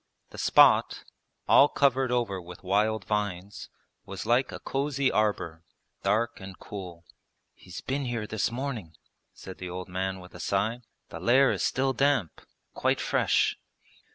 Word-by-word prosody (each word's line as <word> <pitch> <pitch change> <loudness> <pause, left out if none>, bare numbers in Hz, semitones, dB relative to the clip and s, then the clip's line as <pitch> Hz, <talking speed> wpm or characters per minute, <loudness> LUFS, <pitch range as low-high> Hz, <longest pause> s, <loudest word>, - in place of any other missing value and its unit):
The - - -9
spot, - - +5 0.4
all 140 - +7
covered 135 -2 +2
over 115 -7 -1
with 90 +1 -12
wild 105 +2 +1
vines, 100 -2 -3 0.3
was 95 -2 -7
like 120 +3 +2
a - - -7
cosy 140 0 -1
arbour, 95 -6 -1 0.4
dark 115 +2 0
and 95 0 -10
cool. 90 -4 -9 0.5
'He's 90 -2 -10
been 135 +1 -2
here 115 -3 -3
this 110 +1 -1
morning,' 120 - -5 0.4
said 95 - -11
the 90 - -6
old 90 +1 -6
man 95 +1 -3
with 90 0 -14
a 90 - -11
sigh; 105 +7 -1 0.3
'the - - -8
lair 130 +3 +4
is - - -2
still 135 +1 +1
damp, 135 - +1 0.3
quite - - 0
fresh.' - - +1
105 Hz, 150 wpm, -27 LUFS, 95-125 Hz, 0.5 s, all